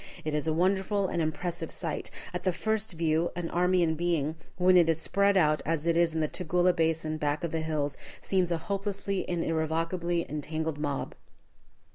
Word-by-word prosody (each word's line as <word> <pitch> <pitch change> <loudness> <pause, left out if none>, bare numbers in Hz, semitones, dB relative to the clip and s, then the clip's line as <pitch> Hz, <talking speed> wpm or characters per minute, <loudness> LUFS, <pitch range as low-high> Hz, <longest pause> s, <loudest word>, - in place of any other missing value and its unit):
It 155 - -1
is 150 +1 -1
a - - +2
wonderful 190 +4 +1
and 170 - -1
impressive 170 +2 -2
sight. - - -3 0.2
At - - -3
the 185 - +2
first 220 +3 -1
view, 165 0 +1
an 170 -1 -3
army 180 +1 +3
in 160 -1 +2
being, 160 -2 0 0.2
when 180 +1 +5
it 170 -2 +6
is 165 -1 +2
spread 200 +3 +2
out 155 -3 +3
as 165 -1 -1
it 170 -1 +2
is 170 -1 +3
in 160 - +1
the 155 - +2
Tugela 180 +2 +1
basin 160 -1 0
back 150 0 -1
of 170 - -2
the 160 - -1
hills, 150 -3 -2 0.2
seems 185 -3 +1
a 170 - +2
hopelessly 200 +2 -3
and 175 -2 0
irrevocably 165 +2 0
entangled 155 +1 -3
mob. 145 -2 -2
165 Hz, 190 wpm, -29 LUFS, 155-180 Hz, 0.2 s, it